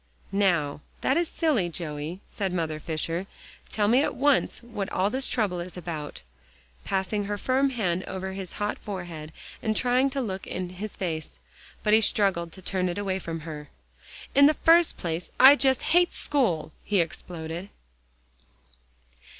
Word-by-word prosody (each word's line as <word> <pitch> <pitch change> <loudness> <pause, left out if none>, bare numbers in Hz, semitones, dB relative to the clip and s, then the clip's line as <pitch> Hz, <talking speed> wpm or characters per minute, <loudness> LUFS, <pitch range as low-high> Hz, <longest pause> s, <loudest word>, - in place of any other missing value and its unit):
"Now, 170 -8 +1 0.2
that 265 - +2
is 340 +1 +2
silly, 280 - +1
Joey," 160 +1 -4
said 195 -3 -3
Mother 160 -3 -2
Fisher, 165 +4 -2 0.4
"tell 210 -1 +1
me 245 +5 +5
at - - -1
once 280 -2 +2
what 225 -5 -5
all 190 +3 +1
this 260 +1 -1
trouble 200 -6 0
is 180 +1 -7
about," 160 -4 -6 0.6
passing 195 +2 -1
her 205 +1 -2
firm 265 +5 +2
hands 190 -8 -1
over 190 0 -4
his 190 -2 -6
hot 205 0 -2
forehead, 175 -6 -6 0.3
and 215 -1 0
trying 255 +2 +3
to 275 +1 -3
look 195 -6 -4
in 180 -1 -3
his 195 +4 -6
face. 160 -5 -4 0.5
But 210 - +3
he 220 - +7
struggled 195 -5 +2
to 190 - -11
turn 185 -1 0
it 175 - -4
away 195 -2 -1
from 165 -2 -5
her. 150 -2 -8 0.6
"In 280 +1 +8
the 305 - +3
first 335 +2 +5
place 170 0 -3
I 270 +2 +10
just 265 -3 +2
hate 350 +1 +3
school!" 195 - 0
he 205 -2 +1
exploded. 170 +2 -4
190 Hz, 160 wpm, -27 LUFS, 170-235 Hz, 0.6 s, I